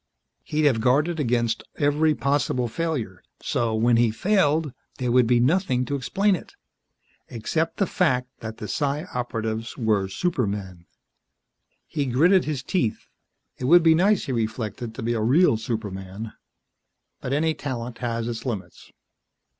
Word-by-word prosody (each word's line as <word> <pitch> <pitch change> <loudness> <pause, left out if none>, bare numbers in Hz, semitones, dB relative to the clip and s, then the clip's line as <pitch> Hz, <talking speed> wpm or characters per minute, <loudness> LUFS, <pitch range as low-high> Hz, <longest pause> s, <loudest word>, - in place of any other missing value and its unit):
He'd 150 0 -1
have 125 -6 +3
guarded 150 +7 +2
against 120 -4 0
every 150 +2 +2
possible 140 -3 0
failure 120 - -3 0.2
so, 115 -2 -1
when 115 +1 +3
he 120 -1 +4
failed, 155 - +1 0.2
there 125 -2 -1
would 125 -1 +4
be 120 0 +4
nothing 130 -2 +2
to 145 - -2
explain 195 +9 +1
it. - - -10 0.7
Except 155 +8 -2
the 200 - +2
"fact" 125 -10 +1
that 110 0 -7
the 105 - -6
Psi 145 +4 -1
Operatives 115 -2 -3
were 110 -5 +1
supermen. 100 - -3 1.0
He 145 -3 -2
gritted 170 +10 +4
his 145 -4 -3
teeth. 135 - -1 0.5
It 125 - -3
would 170 +5 +6
be 165 -1 +6
nice, 195 +5 +3
he - - -3
reflected, 115 0 -3
to 125 - -6
be 120 +1 0
a 115 - -1
real 135 +6 +4
superman. 105 -2 -5 0.9
But 125 - -5
any 160 +3 +2
talent 125 -5 -5
has 115 -1 -2
its 115 -1 -4
limits. 100 -8 -6
125 Hz, 145 wpm, -24 LUFS, 110-150 Hz, 1.0 s, would